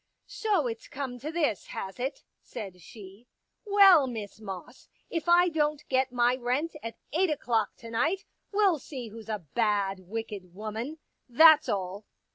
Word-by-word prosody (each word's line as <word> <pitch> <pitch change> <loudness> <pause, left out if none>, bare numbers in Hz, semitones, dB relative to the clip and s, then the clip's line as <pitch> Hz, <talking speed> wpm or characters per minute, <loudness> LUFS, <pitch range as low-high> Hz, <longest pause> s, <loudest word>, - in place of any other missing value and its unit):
" - - -52
So 405 - 0
it's 230 -2 -5
come 260 -3 -5
to 300 +5 -5
this, 310 - 0
has 195 +4 -6
it? 265 +3 -3
" - - -53
said 195 -6 -8
she. 200 +4 -13 0.2
" - - -53 0.2
Well, 390 -8 +7
Miss 215 -4 -6
Moss, 195 +4 -9 0.2
if 330 0 -2
I 350 +1 +6
don't 300 -2 0
get 260 -1 +2
my 245 0 +3
rent 260 +7 -1
at 230 -1 -7 0.2
eight 360 +3 +2
o'clock 235 -7 0
to 230 -1 -11
night, 350 - 0 0.3
we'll 400 -6 +3
see 255 -4 -7
who's 225 +1 -11
a 210 -6 -4
bad, 205 -4 +1
wicked 195 -2 -7
woman 220 +8 -5 0.2
— - - -51
that's 310 +2 +7
all." 195 0 -3
245 Hz, 175 wpm, -28 LUFS, 210-310 Hz, 0.3 s, Well